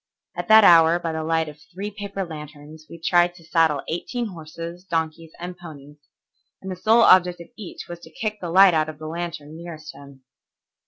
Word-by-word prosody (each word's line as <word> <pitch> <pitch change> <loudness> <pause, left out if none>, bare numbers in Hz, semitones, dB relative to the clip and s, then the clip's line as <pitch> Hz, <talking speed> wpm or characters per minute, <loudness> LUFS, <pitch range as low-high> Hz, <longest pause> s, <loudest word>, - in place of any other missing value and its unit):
At - - -5
that 220 -1 +8
hour 165 -2 +7
by 170 -2 -4
the 160 0 -3
light 160 0 0
of 150 0 -11
three 200 +3 -6
paper 200 -1 -5
lanterns 150 -1 -11
we 170 - -11
tried 175 +1 +2
to 170 - -16
saddle 160 -3 +1
eighteen 235 +7 -3
horses, 170 0 -9
donkeys, 165 -2 -3
and 175 +1 -7
ponies, 150 -4 -12 0.6
and 190 - -7
the - - -4
sole 225 +5 +4
object 180 -3 +5
of 170 - -11
each 210 -5 -9
was 175 0 -8
to - - -14
kick 215 -1 -4
the 175 - -4
light 190 +1 +7
out 155 -1 +1
of 155 - -9
the 155 - -10
lantern 160 -2 -6
nearest 165 -2 -9
him. 140 -2 -15
170 Hz, 200 wpm, -23 LUFS, 155-180 Hz, 0.6 s, that